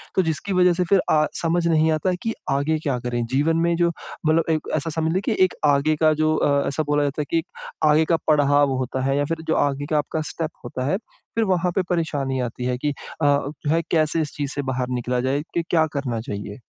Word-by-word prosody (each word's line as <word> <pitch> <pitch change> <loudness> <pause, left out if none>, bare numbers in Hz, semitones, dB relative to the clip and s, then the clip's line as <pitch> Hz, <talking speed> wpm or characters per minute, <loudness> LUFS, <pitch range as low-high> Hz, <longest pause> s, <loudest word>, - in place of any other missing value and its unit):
तो 190 - +4
जिसकी 165 +4 -2
वज़ह 180 -1 +4
से 180 +1 0
फिर 195 - +5
अ, 155 -1 +4 0.2
समझ 170 0 +1
नहीं 160 -1 +3
आता 155 +4 +1
कि 225 - -1 0.2
आगे 140 +3 +1
क्या 135 -4 0
करें? 120 -1 -2
जीवन 150 +5 +2
में 170 - +2
जो 170 0 +3 0.4
मतलब 160 +1 +3
एक 155 -1 0
ऐसा 155 +1 -1
समझ 160 0 -1
ले 190 - +1
की - - -1
एक 185 - -4
आगे 145 +2 +3
का 155 -1 +5
जो 155 0 +3
अ, 140 -2 +2
ऐसा 155 +3 -1
बोला 145 0 +2
जाता 145 +1 -1
है - - -3
कि 165 -1 +2 0.5
आगे 155 +1 +4
का - - +4
पड़ाव 145 -2 +4
होता 130 0 -2
है 135 +1 +1
या 145 - +1
फिर 165 +2 -3
जो 160 - +2
आगे 145 0 0
का 155 - +3
आपका 155 +1 -1
स्टेप 165 -1 -3
होता 130 +1 -4
है, - - +2 0.4
फिर 230 - +2
वहाँ 180 -2 +1
पे 190 - +3
परेशानी 145 -6 -1
आती 125 0 -4
है 125 0 0
कि 145 +4 -1
अ, - - -5 0.3
जो 145 0 0
है 165 +1 +3
कैसे 160 0 +2
इस 150 - -3
चीज़ 145 -1 -2
से 145 - -1
बाहर 125 -1 -2
निकला 125 +1 -1
जाए 135 +3 0
कि 170 - 0
क्या 160 -2 +4
करना 125 -5 -2
चाहिए? 100 0 -6
150 Hz, 240 wpm, -23 LUFS, 140-165 Hz, 0.5 s, फिर